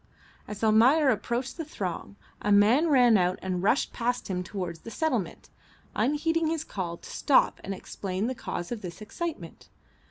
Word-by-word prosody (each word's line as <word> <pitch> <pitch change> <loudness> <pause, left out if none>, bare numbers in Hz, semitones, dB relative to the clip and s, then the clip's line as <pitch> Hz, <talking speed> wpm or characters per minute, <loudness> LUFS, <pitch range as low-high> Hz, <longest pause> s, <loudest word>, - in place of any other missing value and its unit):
As 210 +1 -7
Almayer 250 +7 +5
approached 240 +4 -1
the 330 - -3
throng 185 - -5 0.3
a 210 - 0
man 220 +11 +5
ran 245 -7 +5
out 180 0 +1
and 185 -1 -2
rushed 210 +8 +1
past 245 -2 -2
him 180 -1 -1
towards 180 -3 -5
the 230 - -10
settlement, 315 +8 -2 0.4
unheeding 325 +3 +1
his 320 -1 -1
call 175 - -5
to - - -13
stop 275 - +3
and 195 - -5
explain 190 +1 -4
the 255 - -1
cause 175 -6 -5
of 235 -3 -4
this 175 -2 -8
excitement. 325 +10 -6
220 Hz, 165 wpm, -27 LUFS, 190-280 Hz, 0.4 s, Almayer